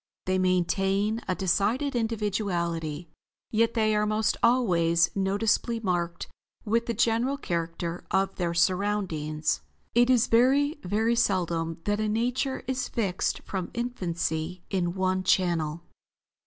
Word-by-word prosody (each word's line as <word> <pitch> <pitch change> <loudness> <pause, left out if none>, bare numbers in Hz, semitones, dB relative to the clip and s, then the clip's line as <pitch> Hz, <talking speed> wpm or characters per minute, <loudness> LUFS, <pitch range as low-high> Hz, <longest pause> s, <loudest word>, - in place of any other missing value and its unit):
They 185 0 +1
maintain 195 +4 +1
a 185 - 0
decided 210 +10 0
individuality; 180 -8 -2 0.4
yet 230 +1 +2
they 215 -1 +2
are 210 0 +1
most 215 0 +1
always 175 -9 +3
noticeably 205 +4 +1
marked 175 -4 -2 0.4
with 230 +2 +1
the 235 - -1
general 235 +5 +1
character 170 - -3
of 195 0 +1
their 170 -2 -1
surroundings. 170 -4 0 0.3
It 240 +1 +4
is 250 -2 +5
very, 275 +6 +3
very 220 +5 +1
seldom 170 -7 0
that 205 +2 0
a 215 0 0
nature 250 +5 -1
is 255 -1 -2
fixed 195 -6 -1
from 190 -3 -4
infancy 175 -7 -3
in 175 -2 0
one 185 0 0
channel." 170 -3 +1
195 Hz, 125 wpm, -27 LUFS, 175-230 Hz, 0.4 s, is